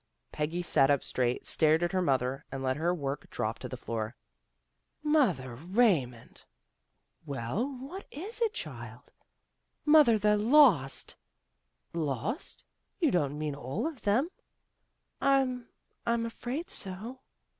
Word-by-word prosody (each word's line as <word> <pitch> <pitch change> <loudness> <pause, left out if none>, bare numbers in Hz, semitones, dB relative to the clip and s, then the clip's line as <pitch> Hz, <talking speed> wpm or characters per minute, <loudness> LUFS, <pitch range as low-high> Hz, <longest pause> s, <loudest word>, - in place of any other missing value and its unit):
" - - -50
Peggy 160 +4 -2
sat 140 -5 +4
up 140 -2 +3
straight, 125 -1 -1
stared 160 +1 +3
at 175 - 0
her 185 -1 +1
mother, 135 -4 0
and 135 0 -4
let 130 0 +1
her 165 +4 +1
work 140 -5 -3
drop 110 -1 -3
to - - -6
the 130 - -6
floor. 115 -1 -4 0.5
" - - -49 0.2
Mother 145 - +1
Raymond! 160 - 0 0.3
" - - -50
" - - -42
Well, 145 - -2
what 335 +10 -8
is 405 - -6
it, 455 -2 +3
child? - - -8 0.3
" - - -51
" - - -49
Mother, 250 -8 +7
they're 210 0 +3
lost." 215 - +4 0.4
" - - -48 0.2
Lost? 250 - -4 0.3
You 320 -7 +3
don't 145 -4 0
mean 150 -1 -2
all 140 - -3
of 315 -6 -4
them? 245 - +2 0.5
" - - -48 0.3
"I'm 260 -3 +2 0.4
I'm 235 0 +1
afraid 245 +7 -5
so." 210 +7 -6
175 Hz, 155 wpm, -30 LUFS, -, 0.5 s, Mother